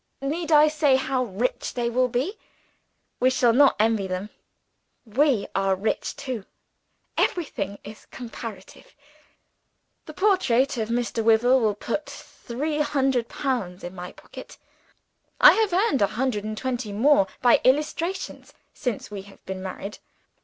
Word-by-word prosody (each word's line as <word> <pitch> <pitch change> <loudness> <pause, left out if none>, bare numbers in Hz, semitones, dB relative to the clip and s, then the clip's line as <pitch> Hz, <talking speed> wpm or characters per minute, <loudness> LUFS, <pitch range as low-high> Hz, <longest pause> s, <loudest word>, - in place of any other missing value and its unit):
Need 315 +4 -3
I 300 0 +7
say 300 -3 +3
how 260 -1 0
rich 230 +4 -3
they 240 -1 0
will 250 +2 +2
be? 265 - -2 0.8
We 255 - +4
shall 245 -2 +3
not 275 +3 +5
envy 215 -2 +2
them 185 +3 -4 0.7
we 245 -1 +2
are 195 0 +1
rich 205 +4 -2
too. 250 -7 -5 0.7
Everything 205 - -1
is 210 +1 -12
comparative. 225 -5 -9 1.1
The 310 - -9
portrait 285 - +2
of 220 -1 -2
Mr. 235 -1 -1
Wyvil 235 +4 +4
will 215 -4 +1
put 235 +8 -3
three 295 +6 -5
hundred 270 -5 +1
pounds 200 -10 -3
in 175 - -6
my 180 -1 -7
pocket. - - -12 0.8
I - - +10
have 435 -3 +1
earned 360 - +2
a 200 - +5
hundred 215 -1 -2
and 215 0 -4
twenty 245 -4 -3
more 220 -1 +4 0.2
by 245 - +5
illustrations, 305 +7 -1 0.2
since 245 -7 -4
we 200 -2 -5
have 195 - -19
been 190 0 -5
married. 195 +2 -7
245 Hz, 140 wpm, -24 LUFS, 210-280 Hz, 1.1 s, I